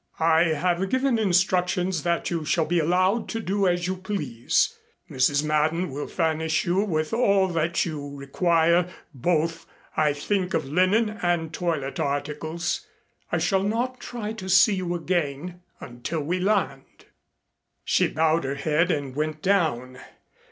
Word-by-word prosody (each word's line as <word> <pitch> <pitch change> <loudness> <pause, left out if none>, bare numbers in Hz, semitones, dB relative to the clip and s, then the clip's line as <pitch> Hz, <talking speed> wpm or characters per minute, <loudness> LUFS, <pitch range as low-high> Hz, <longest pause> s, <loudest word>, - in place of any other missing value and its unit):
"I 160 +1 +4
have 175 +4 0
given 260 -1 +1
instructions 180 -2 +1
that 170 +1 -1
you 165 -2 -1
shall 165 +1 +1
be 175 +2 +1
allowed 185 +7 +1
to 225 - -3
do 200 -2 0
as 175 0 +1
you 185 +1 -1
please. 165 - -1 0.4
Mrs. 140 +3 +2
Madden 155 +2 0
will 145 +2 -5
furnish 160 -1 0
you 175 +2 +1
with 155 -5 -2
all 200 -5 +3
that 165 0 0
you 145 -4 -6
require 170 +4 +2 0.2
both 165 +4 -1 0.3
I 150 -2 +2
think 185 +5 -1
of 155 - 0
linen 200 +8 +1
and 170 -2 0
toilet 160 -5 -2
articles. 150 +3 -2 0.4
I - - +1
shall 195 -1 +1
not 240 +5 -1
try 220 -4 -5
to 190 -4 -7
see 190 +3 +6
you 180 -2 -2
again 175 0 -2 0.2
until 125 +7 -5
we 175 +5 -1
land." 180 -9 -1 0.8
She - - +2
bowed 160 +1 +1
her 135 +1 -2
head 155 +4 +1
and 140 -6 -2
went 155 +1 -3
down. 145 -10 0
170 Hz, 145 wpm, -25 LUFS, 150-185 Hz, 0.8 s, see